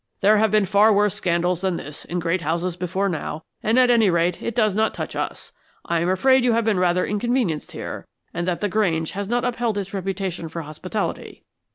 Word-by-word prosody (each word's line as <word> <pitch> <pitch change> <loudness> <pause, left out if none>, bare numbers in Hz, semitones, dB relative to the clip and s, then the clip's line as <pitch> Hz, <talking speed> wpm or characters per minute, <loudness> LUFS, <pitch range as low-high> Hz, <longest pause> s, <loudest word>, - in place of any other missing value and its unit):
"There 210 +2 +5
have 220 +1 +3
been 210 -1 +3
far 205 +3 +5
worse 205 -1 +3
scandals 175 0 0
than 190 -3 0
this 150 +1 -8
in 175 - -4
great 170 +1 0
houses 170 +3 -1
before 185 +2 -1
now; 160 -3 -4 0.2
and, 220 +3 +1
at 250 -1 +5
any 225 -4 +4
rate, 170 0 +1
it 235 - -4
does 215 -4 +2
not 220 +2 +1
touch - - -5
us. - - -4 0.3
I 170 -1 0
am 170 +2 0
afraid 260 +8 +4
you 245 -2 +3
have 230 -1 +1
been 210 -4 +2
rather 180 0 +2
inconvenienced 210 - -1
here, - - -6 0.3
and 175 +1 -3
that 175 -2 -1
the 205 - +1
Grange 175 -6 0
has 200 +1 -4
not 240 +1 0
upheld 240 -3 -1
its 195 -1 -4
reputation 190 -3 -3
for 165 +1 -5
hospitality. 155 0 -5
190 Hz, 215 wpm, -22 LUFS, 175-215 Hz, 0.3 s, There